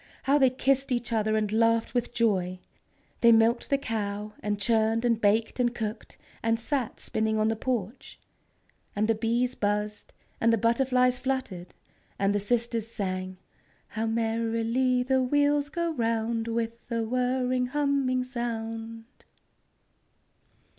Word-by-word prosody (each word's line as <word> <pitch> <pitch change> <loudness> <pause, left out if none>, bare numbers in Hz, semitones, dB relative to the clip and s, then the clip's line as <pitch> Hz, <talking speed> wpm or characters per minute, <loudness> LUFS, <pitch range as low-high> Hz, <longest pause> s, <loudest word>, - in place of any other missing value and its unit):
How 280 +2 +3
they 265 -2 +5
kissed 270 +1 +1
each 240 -1 -1
other 220 0 +1
and 210 -1 -1
laughed 230 0 +2
with 245 -1 -1
joy! 195 -7 0 0.6
They 235 - +6
milked 230 +1 +3
the 275 - +3
cow, 210 -4 -4
and 205 -1 -2
churned, 225 +1 +1
and 230 -2 +1
baked, 220 +4 +1
and 240 -1 +1
cooked, 220 -1 -5 0.2
and 225 0 +1
sat 255 0 -2
spinning 220 0 -1
on 215 0 +2
the 225 - 0
porch. 235 -1 -4 0.8
And 210 +1 +1
the 225 - +3
bees 235 +3 0
buzzed, 210 -1 -2 0.3
and 230 - +3
the 230 - +3
butterflies 250 +2 +2
fluttered, 260 -10 -3 0.4
and 195 0 +1
the 205 - +1
sisters 230 +1 0
sang: 185 -4 -4 0.6
"_How 225 0 -1
merrily 230 +2 0
the 260 +1 +2
wheels 290 +2 +2
go 335 +1 -2
round, 230 -2 -1
With 230 0 -3
a 230 -1 0
whirring, 250 +1 0
humming 275 -2 +1
sound! 225 -2 -5
230 Hz, 140 wpm, -27 LUFS, 220-250 Hz, 0.8 s, They